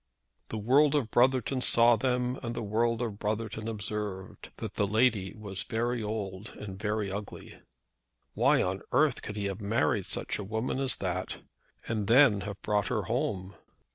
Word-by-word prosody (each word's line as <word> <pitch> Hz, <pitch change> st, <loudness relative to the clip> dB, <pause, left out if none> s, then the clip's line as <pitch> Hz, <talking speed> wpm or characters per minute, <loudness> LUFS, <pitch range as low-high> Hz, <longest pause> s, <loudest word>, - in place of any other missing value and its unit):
The 110 Hz, -, -4 dB
world 135 Hz, +7 st, +4 dB
of 125 Hz, -7 st, 0 dB
Brotherton 130 Hz, +1 st, +3 dB
saw 120 Hz, -1 st, +6 dB
them, 125 Hz, 0 st, 0 dB
and 120 Hz, -1 st, -4 dB
the 115 Hz, -, -3 dB
world 115 Hz, +3 st, +1 dB
of 110 Hz, -3 st, -4 dB
Brotherton 110 Hz, +1 st, -3 dB
observed 105 Hz, -3 st, -4 dB
that -, -, -5 dB
the 100 Hz, -, 0 dB
lady 110 Hz, -3 st, +2 dB
was 100 Hz, -3 st, -6 dB
very 120 Hz, +1 st, -1 dB
old 105 Hz, -2 st, -4 dB
and 95 Hz, -2 st, -7 dB
very 105 Hz, -2 st, -1 dB
ugly. 100 Hz, +1 st, -7 dB, 0.7 s
Why -, -, +4 dB
on 95 Hz, +1 st, -2 dB
earth 145 Hz, +1 st, +3 dB
could 105 Hz, -, -6 dB
he 105 Hz, -1 st, -2 dB
have 100 Hz, +1 st, -3 dB
married 100 Hz, -7 st, +1 dB
such -, -, -3 dB
a -, -, -3 dB
woman 110 Hz, +6 st, -2 dB
as 135 Hz, -1 st, +1 dB
that, 90 Hz, -1 st, -3 dB, 0.5 s
and 110 Hz, -3 st, -1 dB
then 115 Hz, -4 st, +6 dB
have 100 Hz, +1 st, -6 dB
brought 105 Hz, -1 st, +1 dB
her 110 Hz, -4 st, -1 dB
home! 105 Hz, -5 st, -2 dB
110 Hz, 170 wpm, -29 LUFS, 100-120 Hz, 0.7 s, saw